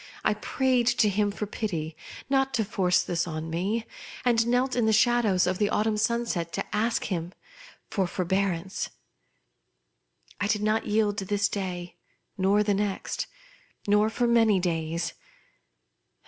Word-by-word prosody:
I - - +4
prayed 255 -3 +1
to 215 -3 +4
him 205 +1 +1
for 205 +1 -4
pity, 165 -7 -4 0.3
not 270 0 +1
to 220 -3 +1
force 185 -3 +2
this 170 0 -1
on 160 0 -4
me, 200 +7 -1 0.4
and 235 -2 +3
knelt 250 +2 +1
in 240 -3 +2
the 220 - +3
shadows 220 -4 +3
of 180 0 -1
the 205 -1 +2
autumn 215 +1 +1
sunset 220 -6 0
to - - -2
ask 225 +2 0
from 190 - -1
him 170 +2 -5 0.6
forbearance. 190 -1 -1 1.5
I 205 - 0
did 210 -1 0
not 215 +1 +1
yield 210 -1 +1
this 200 +1 0
day, 180 -4 -5 0.4
nor 200 +1 +3
the 205 -1 +1
next, 200 -1 -2 0.6
nor 210 +1 +4
for 240 +2 0
many 225 -4 +4
days. 165 -1 -2
205 Hz, 145 wpm, -27 LUFS, 185-225 Hz, 1.5 s, I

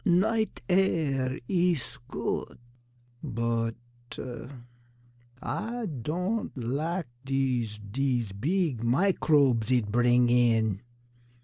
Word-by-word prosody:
"Night 220 - +2
air 145 -8 +1
is 175 -7 0
good; - - -3 0.6
but 115 -3 -1 1.7
Ah 230 +2 -3 0.2
don' 180 - -1
lak 150 +8 -2 0.2
dese 130 -5 0
dese 120 +1 -1
beeg 145 - 0
microbes 135 - +3
eet 115 -5 +2
bring 120 +1 +4
in." 115 -4 +3
130 Hz, 80 wpm, -28 LUFS, 115-175 Hz, 1.7 s, bring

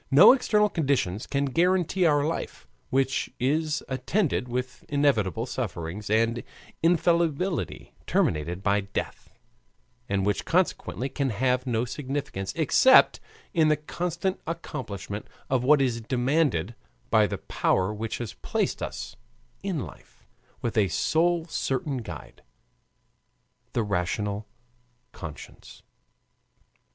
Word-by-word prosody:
No 140 +2 +9
external 210 -5 +3
conditions 135 - 0
can 140 0 0
guarantee 180 +4 +2
our 145 -2 +3
life, 165 - -4 0.2
which 135 0 +1
is 150 +4 0
attended 130 +3 0
with 125 +1 -4
inevitable 120 -7 +1
sufferings 105 -6 -4
and 115 +2 +2 0.4
infallibly 170 0 +1
terminated 85 +5 0
by 100 0 +2
death, 100 - -5 0.8
and 95 -1 +1
which 105 0 0
consequently 165 -7 0
can 135 0 -1
have 125 +3 0
no 120 -1 +1
significance 135 -7 -4
except 170 - +6 0.3
in 160 -4 +4
the 155 -1 +3
constant 175 +4 -3
accomplishment 110 - -5 0.2
of 130 -2 +2
what 145 +3 +5
is 125 -4 0
demanded 125 - +1 0.4
by - - +5
the - - -3
Power 95 +3 0
which 110 +1 -4
has 120 -3 -5
placed - - -2
us - - -5 0.5
in - - -2
life - - -15 0.4
with 115 -1 +1
a 100 - +4
sole 165 - +1
certain 135 -3 -2
guide 60 - -8 1.3
the 115 - +1
rational 100 +2 -2 0.6
conscience. 80 -3 -10
130 Hz, 115 wpm, -26 LUFS, 105-160 Hz, 1.3 s, No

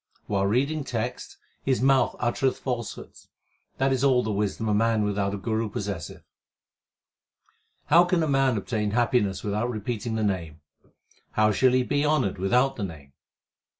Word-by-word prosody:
While 100 -1 0
reading 140 +8 0
texts 120 -2 -4 0.2
his 130 -2 0
mouth 135 0 +3
uttereth 130 +2 0
falsehoods; 120 -5 -6 0.5
that 135 0 +2
is 130 0 -1
all 130 -3 +4
the 110 - -2
wisdom 105 +2 -2
a 105 - +2
man 110 0 +2
without 100 -1 -1
a - - -4
guru 110 +2 -2
possesseth. 100 -5 -5 1.6
How 170 +3 +6
can 175 -3 +1
man 135 -3 +2
obtain 105 +1 -2
happiness 120 -6 +1
without 105 +3 -1
repeating 110 0 -3
the 110 - -1
Name? 85 -7 -2 0.7
How 110 0 +3
shall 125 +4 +3
he 130 0 +3
be 145 +3 0
honoured 140 -11 +1
without 125 +8 +2
the 105 - -3
Name 75 -7 -8
115 Hz, 150 wpm, -26 LUFS, 100-130 Hz, 1.6 s, How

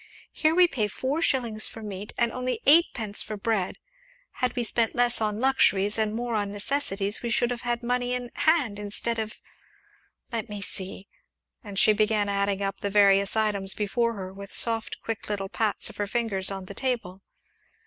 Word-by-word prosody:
Here 315 0 +1
we 360 0 +7
pay 225 -10 -1
four 265 +9 -2
shillings 235 -8 +1
for 225 - -9
meat, 205 0 -6
and 235 -1 +2
only 250 -2 -2
eightpence 265 -9 +3
for 215 - -5
bread; 200 -3 -1 0.7
had 250 -1 +1
we 245 - 0
spent 230 0 +1
less 245 -1 +3
on 210 -1 0
luxuries 215 -6 +3
and 215 0 0
more 240 0 -3
on 205 -2 -1
necessaries 205 -2 +1
we 235 - -3
should 240 +1 +1
have 240 - -4
had 240 0 -2
money 245 +1 0
in 245 -1 -5
hand 290 -11 +2
instead 210 +3 -1
of 220 0 -5 0.9
let 230 -1 -3
me 205 -1 -5
see!" 195 0 -6 0.6
and 200 -3 -8
she 215 - +6
began 210 -1 +1
adding 200 0 0
up 195 0 -3
the 200 - -1
various 200 -1 +4
items 200 -3 +1
before 230 +3 0
her 190 -3 -7
with 200 0 -8
soft, 225 -1 +2
quick 225 -2 -5
little 195 -2 -2
pats 215 0 -1
of - - -8
her 205 - -1
fingers 200 -4 0
on 195 -1 -5
the 200 - -8
table. 215 -6 -3
215 Hz, 185 wpm, -26 LUFS, 200-240 Hz, 0.9 s, we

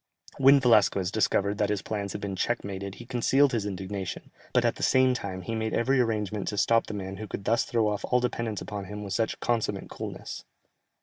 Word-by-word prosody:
When 135 +1 +7
Velasquez 105 -6 +3
discovered 100 -1 +1
that 105 - +2
his 105 -2 -1
plans 100 -3 -3
had - - -5
been 100 -1 -3
check 120 +6 -1
mated 100 0 -5
he 120 - -11
concealed 130 +3 +3
his 110 -5 -1
indignation, 95 -1 -5 0.2
but - - +3
at - - +1
the - - -9
same 130 0 +4
time, 95 -6 -5
he 115 - -4
made 110 0 -1
every 130 +3 +2
arrangement 105 -4 -1
to 105 - -2
stop 115 +3 +3
the 105 - -5
man 95 -1 -5
who 110 +1 -6
could 100 - -6
thus 115 +2 +2
throw 115 -2 +1
off 105 -1 -2
all 125 - +2
dependence 115 -3 -2
upon 100 -2 -5
him 105 +2 -7
with 100 -1 -4
such 115 +3 -1
consummate 120 -2 -1
coolness. - - -6
105 Hz, 220 wpm, -27 LUFS, 100-120 Hz, 0.2 s, When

